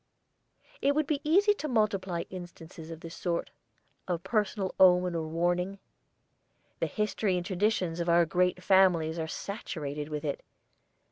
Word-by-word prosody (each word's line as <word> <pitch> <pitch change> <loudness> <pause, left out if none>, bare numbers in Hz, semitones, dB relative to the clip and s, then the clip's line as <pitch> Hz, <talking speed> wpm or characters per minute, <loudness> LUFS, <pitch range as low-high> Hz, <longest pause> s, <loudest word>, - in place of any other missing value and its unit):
It 285 +1 +2
would 305 0 +2
be 290 0 -1
easy 395 +7 +4
to 310 - -5
multiply 200 - 0
instances 175 -3 -9
of 165 -1 -8
this 165 0 -8
sort: 170 -2 -2 0.6
of 175 -2 -2
personal 210 -3 -1
omen 180 -1 +5
or 160 -2 -2
warning. 175 +4 0 1.0
The - - 0
history 210 -3 0
and 175 - -3
traditions 185 -3 0
of 170 0 -1
our 170 0 +5
great 180 +2 +1
families 175 -4 +4
are 160 - -2
saturated 150 -7 -5
with 150 0 -4
it. 140 - -2
180 Hz, 145 wpm, -29 LUFS, 165-205 Hz, 1.0 s, omen